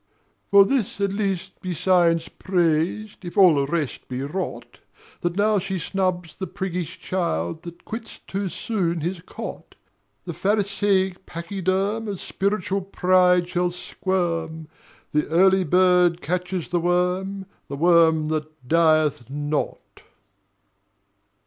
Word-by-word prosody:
For 200 0 +7
this 235 -3 -1
at 200 -1 0
least 190 -2 -3
be 180 -2 -3
Science 170 -1 +3
praised 180 +4 -1
If 175 - -8
all 185 -4 +8
the 140 -1 +1
rest 155 -3 -3
be 130 +1 -4
rot, 185 +7 -5 0.4
That 175 0 -2
now 210 0 +3
she 190 0 -3
snubs 180 -1 -2
the 190 - -5
priggish 180 -1 -4
child 160 - -2
That 170 0 -11
quits 225 0 -7
too 195 0 -3
soon 175 -6 -2
his 175 +2 -3
cot: 180 - -8 0.5
The 175 - -4
pharisaic 195 0 0
pachyderm 195 +5 -2
Of 200 -3 -4
spiritual 195 0 -1
pride 180 -2 +3
shall 180 0 0
squirm: 165 -3 -3 0.4
The 150 0 +1
Early 190 +4 +4
Bird 180 0 +4
catches 180 +1 -3
the 175 -1 +1
worm, 180 +3 0 0.2
The 140 - -5
Worm 160 -1 +4
that 155 -3 -4
dieth 155 -5 +3
not. 145 +1 -3
180 Hz, 125 wpm, -23 LUFS, 165-190 Hz, 0.5 s, all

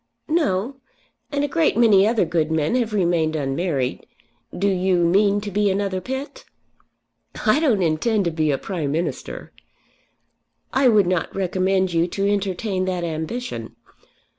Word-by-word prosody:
"No; 275 - 0 0.5
and 285 -1 0
a - - +1
great 320 -4 +1
many 210 -4 +5
other 225 -4 +2
good 160 -1 0
men 160 +2 0
have 240 -3 0
remained 170 -5 +1
unmarried. 140 -2 -2 0.5
Do 195 +3 +1
you 185 -2 +2
mean 200 +3 +3
to 205 0 -6
be 205 +1 +2
another 195 -1 -1
Pitt?" 270 - -6 1.0
"I 220 +6 +4
don't 240 - +2
intend 195 +6 +1
to 170 - 0
be 155 -1 0
a 140 - +1
Prime 160 -6 -3
Minister." 165 +4 -4 1.2
"I 265 0 +4
would 215 -5 +5
not 180 -2 -1
recommend 190 0 0
you 165 +1 +2
to 195 +3 -1
entertain 195 -1 -1
that 180 -2 -2
ambition. 160 - -5
190 Hz, 145 wpm, -22 LUFS, 170-215 Hz, 1.2 s, many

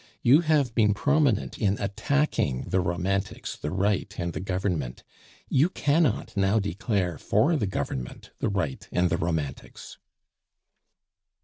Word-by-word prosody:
You 135 +6 +7
have 150 -7 +2
been 105 -3 +3
prominent 145 -2 +1
in 100 -2 +1
attacking 100 - 0
the 95 - +2
Romantics, 95 +3 -2
the 75 - -5
Right, 100 +2 0
and 85 -1 -3
the - - -4
Government; 90 -9 -2 0.4
you 150 +7 +3
cannot 145 - +1
now 100 +2 +2
declare 100 -4 -1
for 165 +3 +2
the 110 -9 0
Government; 70 -8 -5
the - - 0
Right, 95 -9 -2
and 90 0 +1
the - - +2
Romantics." 80 -5 -4
100 Hz, 130 wpm, -26 LUFS, 85-120 Hz, 0.4 s, You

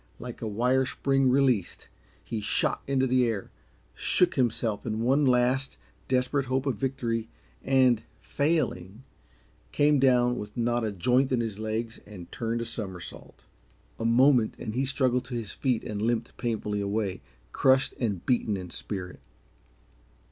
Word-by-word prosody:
Like 120 0 -8
a 115 - -3
wire 125 +5 +1
spring 135 0 +1
released, 125 -8 +1 0.4
he 115 -2 -4
shot 105 - +1
into 135 -1 +2
the 125 -1 +3
air, 110 -4 -3 0.4
shook 180 -1 +2
himself 115 -4 0
in 110 -1 -2
one 135 +3 +3
last, 125 +2 +2 0.3
desperate 130 +1 0
hope 130 +1 0
of 135 - -1
victory, 120 -4 -2 0.3
and, 130 -4 +4 0.2
failing, 130 - -1 0.7
came 145 0 +3
down 125 -2 +3
with 105 +2 -8
not 120 0 +1
a 110 - -1
joint 125 +8 +2
in 125 - +2
his 110 -3 -3
legs 110 +1 -3
and 95 -5 -11
turned 115 0 -2
a - - -3
somersault. 95 -6 -7 0.5
A - - -3
moment, 120 0 +4
and 110 - -5
he 130 +3 0
struggled 130 -2 +1
to 125 -1 -6
his 115 -4 -4
feet 125 -5 -1
and 105 -1 -4
limped 115 +1 -1
painfully 105 -3 -2
away, 100 -1 -2 0.3
crushed 130 0 +3
and 100 -8 -2
beaten 115 -5 +1
in 90 -2 -8
spirit. 90 -3 -6
120 Hz, 150 wpm, -27 LUFS, 110-130 Hz, 0.7 s, and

